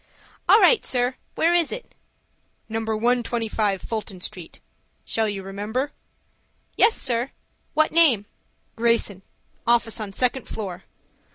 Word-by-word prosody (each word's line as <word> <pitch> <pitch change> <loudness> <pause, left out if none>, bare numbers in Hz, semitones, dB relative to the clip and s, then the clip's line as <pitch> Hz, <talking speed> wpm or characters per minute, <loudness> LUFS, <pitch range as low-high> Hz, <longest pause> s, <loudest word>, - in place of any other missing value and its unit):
"All - - +8
right, 475 -4 +5
sir. 245 0 +1 0.2
Where 335 +2 +3
is 345 -3 +3
it?" - - -7 0.7
"No. 225 0 -2
125 225 -2 0
Fulton 215 -4 -5
Street. 180 -2 -8 0.5
Shall 220 -1 0
you 195 -2 -4
remember?" 210 +8 -3 0.8
"Yes, 440 - +4
sir. 245 0 0 0.5
What 310 0 +3
name?" 295 -11 +5 0.5
"Greyson,—office 230 +1 0
on 210 -2 -5
second 250 +4 0
floor." 195 -4 -6
230 Hz, 110 wpm, -24 LUFS, 205-255 Hz, 0.8 s, All